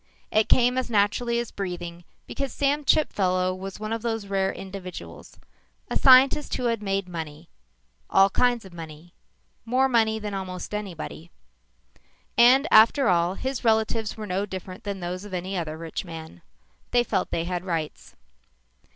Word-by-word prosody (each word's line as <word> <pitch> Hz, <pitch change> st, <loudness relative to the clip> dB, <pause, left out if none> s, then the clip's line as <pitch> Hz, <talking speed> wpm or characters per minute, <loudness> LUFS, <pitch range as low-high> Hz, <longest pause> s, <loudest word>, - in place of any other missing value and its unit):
It 215 Hz, 0 st, +2 dB
came 250 Hz, +1 st, +4 dB
as 255 Hz, -, -4 dB
naturally 235 Hz, +3 st, +1 dB
as 235 Hz, -1 st, -3 dB
breathing 175 Hz, -3 st, -6 dB, 0.2 s
because 275 Hz, -2 st, -4 dB
Sam 285 Hz, +3 st, 0 dB
Chipfellow 185 Hz, -12 st, +2 dB
was 190 Hz, +1 st, -7 dB
one 215 Hz, +1 st, -3 dB
of 225 Hz, -, -3 dB
those 225 Hz, -2 st, -2 dB
rare 195 Hz, -1 st, 0 dB
individuals 190 Hz, -2 st, -9 dB, 0.5 s
a -, -, -1 dB
scientist 265 Hz, +2 st, +5 dB
who -, -, -3 dB
had 230 Hz, -2 st, 0 dB
made 195 Hz, -2 st, -1 dB
money; 160 Hz, -, -7 dB, 0.6 s
all 195 Hz, 0 st, +6 dB
kinds 245 Hz, -1 st, +1 dB
of 190 Hz, -, -13 dB
money; 165 Hz, +1 st, -10 dB, 0.5 s
more 255 Hz, +3 st, +2 dB
money 225 Hz, -3 st, +2 dB
than 210 Hz, -1 st, -5 dB
almost 185 Hz, 0 st, -5 dB
anybody. 175 Hz, -5 st, -6 dB, 1.1 s
And 255 Hz, +5 st, +6 dB
after 225 Hz, +3 st, +6 dB
all, 175 Hz, +1 st, +2 dB
his 265 Hz, +3 st, -4 dB
relatives 220 Hz, -1 st, +1 dB
were 215 Hz, -, -5 dB
no 195 Hz, +1 st, -2 dB
different 190 Hz, +2 st, -8 dB
than 200 Hz, -2 st, -4 dB
those 180 Hz, +2 st, -4 dB
of 205 Hz, -3 st, -6 dB
any 185 Hz, +2 st, -4 dB
other 160 Hz, -3 st, -3 dB
rich 165 Hz, 0 st, -5 dB
man. 160 Hz, -, -10 dB, 0.5 s
They 240 Hz, 0 st, +3 dB
felt -, -, -1 dB
they 165 Hz, -, -1 dB
had 180 Hz, +1 st, -3 dB
rights. 165 Hz, -5 st, -4 dB
195 Hz, 160 wpm, -25 LUFS, 180-235 Hz, 1.1 s, all